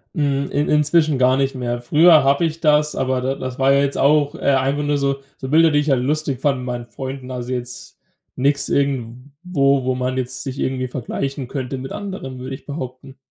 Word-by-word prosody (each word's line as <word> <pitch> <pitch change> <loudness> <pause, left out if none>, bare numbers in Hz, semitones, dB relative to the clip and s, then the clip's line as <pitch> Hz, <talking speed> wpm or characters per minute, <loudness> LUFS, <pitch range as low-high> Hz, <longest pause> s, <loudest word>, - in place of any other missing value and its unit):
Hm, 140 -2 0
in 145 +1 0
inzwischen 150 0 +3
gar 130 0 +4
nicht 135 0 0
mehr. 120 -1 -3
Früher 155 +4 +6
habe 140 +4 +3
ich 165 0 -4
das, 150 -1 +3
aber 130 -1 0
da 130 +2 -1
das 130 -1 -6
war 135 +1 +4
ja 140 - +4
jetzt 140 0 -1
auch 145 0 +3
äh, - - -10
einfach 135 +2 +1
nur 145 0 +1
so 140 -1 0 0.2
so 130 - -6
Bilder, 160 +2 +5
die 145 - +3
ich 150 +1 -1
halt 135 -3 +3
lustig 145 -2 -1
fande 140 -3 +1
mit 125 - -6
meinen 120 -1 -4
Freunden. 130 +1 -7
Also, 125 0 -5
jetzt 125 0 -6 0.4
nix 140 +2 +1
irgendwo, 140 +2 0
wo 130 0 0
man 125 0 -2
jetzt 130 0 -3
sich 135 0 -5
irgendwie 130 -1 -1
vergleichen 135 +1 -4
könnte 135 -1 -4
mit 130 +1 -7
anderen, 190 -11 -6
würde 130 +1 -5
ich - - -15
behaupten. 130 -2 -7
135 Hz, 210 wpm, -20 LUFS, 130-145 Hz, 0.4 s, Früher